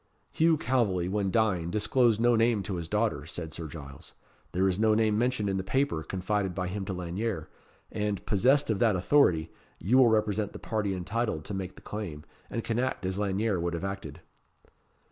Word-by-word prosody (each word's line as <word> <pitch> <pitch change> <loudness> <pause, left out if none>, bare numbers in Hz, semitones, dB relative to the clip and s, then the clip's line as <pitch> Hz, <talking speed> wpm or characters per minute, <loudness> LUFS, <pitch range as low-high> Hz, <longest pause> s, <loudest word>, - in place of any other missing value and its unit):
"Hugh 160 0 +3
Calveley, 110 -10 +1
when 100 0 0
dying, 95 -6 +1
disclosed 110 +3 +2
no 120 +1 +4
name 115 -2 +2
to 95 -3 -3
his 85 -1 -5
daughter," 85 -8 0
said 80 -2 -6
Sir 80 0 -5
Giles. 70 -3 -10 0.4
"There 95 +2 +2
is 95 +1 0
no 110 -1 +4
name 110 -1 +2
mentioned 120 -2 +1
in 95 -1 0
the 95 - -2
paper 130 - 0
confided 95 +3 -2
by 90 -1 -2
him 100 +1 -4
to 95 - -3
Lanyere; 90 0 -3 0.4
and, 105 -2 -2
possessed 125 +5 +3
of 105 - -1
that 110 -4 +3
authority, 90 - +3 0.3
you 120 +9 +3
will 130 - +7
represent 105 -1 +1
the - - -7
party 105 -4 -2
entitled 95 -3 -2
to 105 - -5
make 95 -1 -4
the - - -15
claim, 90 -9 -6 0.3
and 115 - -3
can 115 0 -1
act 130 -6 -1
as 95 +1 -2
Lanyere 100 0 0
would 85 0 -1
have 85 - -5
acted." 95 0 -6
100 Hz, 195 wpm, -29 LUFS, 90-115 Hz, 0.4 s, will